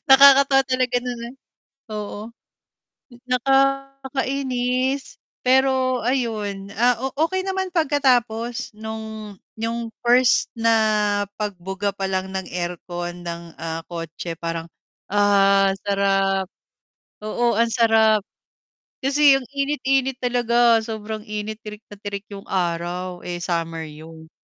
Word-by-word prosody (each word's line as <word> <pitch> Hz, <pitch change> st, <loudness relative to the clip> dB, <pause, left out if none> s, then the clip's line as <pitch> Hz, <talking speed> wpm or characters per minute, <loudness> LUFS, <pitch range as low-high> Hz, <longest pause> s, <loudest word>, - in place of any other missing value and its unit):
nakakatawa 275 Hz, 0 st, +8 dB
talaga 255 Hz, -1 st, 0 dB
no'n, 245 Hz, -1 st, -4 dB
eh, -, -, -10 dB, 0.6 s
oo. 210 Hz, 0 st, -6 dB, 1.0 s
Nakakainis 270 Hz, 0 st, 0 dB, 0.2 s
pero 260 Hz, -1 st, +2 dB
ayon, 215 Hz, -6 st, -1 dB
ah, 240 Hz, 0 st, +3 dB
o 265 Hz, +2 st, -2 dB, 0.2 s
okey 375 Hz, +2 st, -2 dB
naman 380 Hz, -1 st, -2 dB
pagkatapos 245 Hz, -, +1 dB
no'ng 220 Hz, -2 st, -7 dB, 0.2 s
yong 230 Hz, +1 st, -3 dB, 0.2 s
first 245 Hz, +1 st, +4 dB
na 230 Hz, -1 st, +1 dB, 0.7 s
pagbuga 200 Hz, 0 st, -3 dB
palang 190 Hz, -1 st, -2 dB
ng 190 Hz, 0 st, -4 dB
aircon 175 Hz, 0 st, -5 dB
ng, 170 Hz, 0 st, -5 dB
ah, 165 Hz, 0 st, -4 dB
kotse 165 Hz, 0 st, -6 dB
parang, 165 Hz, 0 st, -4 dB, 0.4 s
ah, 200 Hz, -1 st, +4 dB, 0.2 s
sarap, 195 Hz, -1 st, +2 dB, 0.8 s
oo 235 Hz, +2 st, +1 dB
ang 230 Hz, 0 st, +3 dB
sarap. 220 Hz, -2 st, +4 dB, 0.8 s
Kasi 280 Hz, +1 st, +5 dB
ang 255 Hz, -, -11 dB
init-init 270 Hz, -2 st, 0 dB
talaga 240 Hz, -2 st, +3 dB
sobrang 220 Hz, -1 st, -5 dB
init, 210 Hz, +1 st, -4 dB
tirik 210 Hz, 0 st, -8 dB
na -, -, -8 dB
tirik 205 Hz, -1 st, -5 dB
'yong 195 Hz, 0 st, -8 dB
araw, 175 Hz, 0 st, -2 dB
eh, 175 Hz, 0 st, -4 dB
summer 165 Hz, -2 st, -2 dB
'yon. 160 Hz, +1 st, -12 dB
220 Hz, 110 wpm, -22 LUFS, 195-255 Hz, 1.0 s, nakakatawa